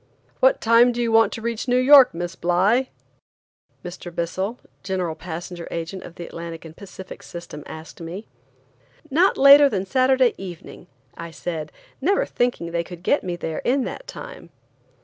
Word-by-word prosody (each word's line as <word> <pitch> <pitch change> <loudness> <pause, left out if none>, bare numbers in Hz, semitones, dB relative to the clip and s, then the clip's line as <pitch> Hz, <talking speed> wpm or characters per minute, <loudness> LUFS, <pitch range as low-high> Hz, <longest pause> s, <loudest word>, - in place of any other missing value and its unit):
"What - - +4
time 230 +2 +5
do 240 - -5
you 235 -1 0
want 225 0 +4
to 225 - -7
reach 235 +1 -3
New 245 0 +3
York, 265 +1 +7
Miss 175 +1 -5
Bly?" 195 +9 +2 1.0
Mr. 180 0 -7
Bissell, 190 +7 -3 0.2
General 185 -4 -2
Passenger 170 +1 -7
Agent 170 +3 -5
of 170 - -11
the 170 - -7
Atlantic 165 -1 -8
and 160 0 -11
Pacific 190 -1 -11
system, 170 -3 -9
asked 160 +1 -10
me. 175 +6 -7 0.9
"Not 355 +7 +3
later 280 +1 +8
than 195 -5 -2
Saturday 255 +2 +3
evening," 180 -1 -10 0.3
I 170 0 -7
said, 160 -2 -5 0.3
never 385 +8 +2
thinking 240 -9 -2
they 170 0 -1
could 175 0 -11
get 285 - +2
me 180 -2 -3
there 165 -2 -4
in 260 +2 +1
that - - -7
time. - - -10
190 Hz, 165 wpm, -22 LUFS, 170-245 Hz, 1.0 s, later